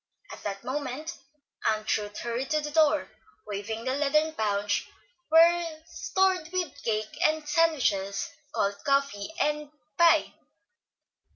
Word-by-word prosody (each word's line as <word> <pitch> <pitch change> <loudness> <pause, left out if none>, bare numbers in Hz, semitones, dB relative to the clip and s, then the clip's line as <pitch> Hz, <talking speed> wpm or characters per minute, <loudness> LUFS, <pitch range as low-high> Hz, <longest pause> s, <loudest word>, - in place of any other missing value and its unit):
At - - -9
that 200 -1 -5
moment 290 +4 -4 0.5
Aunt 215 0 +1
Ruth 210 0 -5
hurried 240 +3 -3
to 305 - +2
the 295 0 -4
door, 310 -1 +3 0.3
waving 215 +3 -4
the 260 - 0
leathern 305 +2 +2
pouch 205 -4 0 0.4
well 330 0 +5
stored 370 0 0
with 360 -6 -3
cake 215 -1 -2
and 310 -1 +2
sandwiches, 260 - +1 0.2
cold 200 0 -1
coffee 275 -5 0
and 300 0 0 0.3
pie. 340 -1 +5
280 Hz, 120 wpm, -28 LUFS, 215-315 Hz, 0.5 s, well